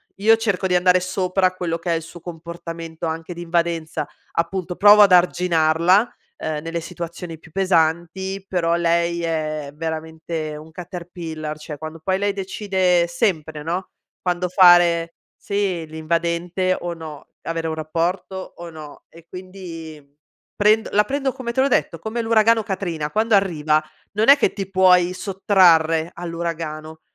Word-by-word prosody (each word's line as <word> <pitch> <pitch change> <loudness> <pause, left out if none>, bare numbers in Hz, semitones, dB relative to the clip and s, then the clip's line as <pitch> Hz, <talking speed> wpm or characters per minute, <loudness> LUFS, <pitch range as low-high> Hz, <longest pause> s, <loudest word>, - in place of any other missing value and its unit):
Io 220 +3 +5
cerco 205 -4 -1
di 180 - +1
andare 180 0 +4
sopra 185 0 0
quello 170 -2 -2
che 170 +1 -3
è - - +3
il 165 - -2
suo 165 +2 -11
comportamento 165 -1 -7
anche 165 +2 -4
di 170 - -8
invadenza. 170 -3 -1 0.3
Appunto, 180 +1 -2
provo 205 +2 +7
ad 195 -2 +5
arginarla, 175 +3 +3 0.2
uhm, 155 -1 -3
nelle 165 +1 -4
situazioni 170 -1 -7
più 160 - -17
pesanti, 185 +2 0
però 170 -3 +1
lei 170 0 +1
è 155 -3 -2
veramente 160 0 -5
un 155 +1 -12
Caterpillar. 170 -3 -7
Cioè 150 -1 -8
quando 155 +1 -8
poi 190 +1 +1
lei 205 0 0
decide 190 -3 +1
sempre 160 -5 -1
no, 175 +4 -3 0.3
quando 180 0 -1
fare 175 -2 +5 0.2
sì 195 -5 -2
l'invadente 170 +3 -1
o 175 -1 -4
no, 155 -3 -10 0.2
avere 165 0 -3
un 160 - -3
rapporto 170 +4 -2 0.2
o 175 0 -8
no. 155 -3 -11
E 165 0 -17
quindi 175 -5 -9 0.5
prendo 215 +1 +3
la 210 +1 +3
prendo 275 0 -1
come 250 -3 -5
te 260 - +2
l'ho 275 - +3
detto, - - +1
come 225 +2 -3
l'uragano 225 0 +4
Katrina, 180 -7 -3
quando 220 0 +2
arriva 155 -6 +2 0.3
non 215 +2 +1
è 280 - +10
che 265 -9 +1
ti 195 -2 -5
puoi 180 -2 +4
sottrarre 175 -5 +3
all'uragano, 165 -2 -5
170 Hz, 150 wpm, -21 LUFS, 160-190 Hz, 0.5 s, è